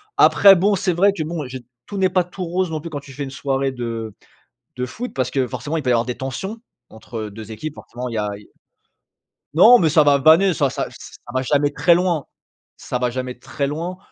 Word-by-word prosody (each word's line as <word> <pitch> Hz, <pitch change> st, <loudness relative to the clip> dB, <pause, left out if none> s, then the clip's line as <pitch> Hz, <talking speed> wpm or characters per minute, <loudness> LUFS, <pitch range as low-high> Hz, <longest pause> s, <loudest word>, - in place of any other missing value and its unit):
Après 195 Hz, -1 st, +7 dB
bon, 200 Hz, +3 st, +2 dB
c'est 185 Hz, -1 st, 0 dB
vrai 195 Hz, +4 st, +4 dB
que 170 Hz, -5 st, -4 dB
bon, 160 Hz, -2 st, -4 dB
j'ai 130 Hz, 0 st, -6 dB, 0.3 s
tout 200 Hz, -, -6 dB
n'est 190 Hz, -1 st, +3 dB
pas 185 Hz, -1 st, +2 dB
tout 180 Hz, +1 st, -7 dB
rose 180 Hz, 0 st, -1 dB
non 155 Hz, -, -2 dB
plus 170 Hz, +2 st, -8 dB
quand 145 Hz, -2 st, -5 dB
tu 140 Hz, -, -13 dB
fais 140 Hz, +2 st, -5 dB
une 135 Hz, -, -8 dB
soirée 135 Hz, -1 st, -1 dB
de 115 Hz, -3 st, -5 dB, 0.6 s
de 125 Hz, 0 st, -2 dB
foot, 240 Hz, -, -7 dB
parce 130 Hz, -1 st, -1 dB
que 130 Hz, -2 st, 0 dB
forcément, 135 Hz, +6 st, -4 dB
il -, -, -1 dB
peut 125 Hz, -, 0 dB
y -, -, +4 dB
avoir 115 Hz, 0 st, +2 dB
des 125 Hz, -, -3 dB
tensions 190 Hz, -, -5 dB, 0.3 s
entre 110 Hz, -1 st, -7 dB
2 110 Hz, +1 st, -10 dB
équipes, 155 Hz, +7 st, -6 dB
forcément 125 Hz, -2 st, -8 dB
il 120 Hz, -, -6 dB
y -, -, -2 dB
a 105 Hz, -1 st, -1 dB
il 105 Hz, -, -15 dB
y -, -, -21 dB, 1.1 s
Non, 225 Hz, +9 st, +8 dB
mais 160 Hz, -, +3 dB
ça 155 Hz, 0 st, +5 dB
va 145 Hz, -1 st, +5 dB
vanner, 160 Hz, +6 st, +5 dB
ça 145 Hz, -4 st, +1 dB
ça -, -, -3 dB
c -, -, -16 dB
ça 120 Hz, -, -12 dB
va 130 Hz, -, 0 dB
jamais 145 Hz, +2 st, +2 dB
très 170 Hz, +3 st, +4 dB
loin 175 Hz, -5 st, 0 dB, 0.5 s
ça 125 Hz, -, -4 dB
va 125 Hz, -1 st, +1 dB
jamais 125 Hz, 0 st, -5 dB
très 140 Hz, +2 st, -3 dB
loin, 170 Hz, +5 st, -4 dB
145 Hz, 245 wpm, -21 LUFS, 125-175 Hz, 1.1 s, Non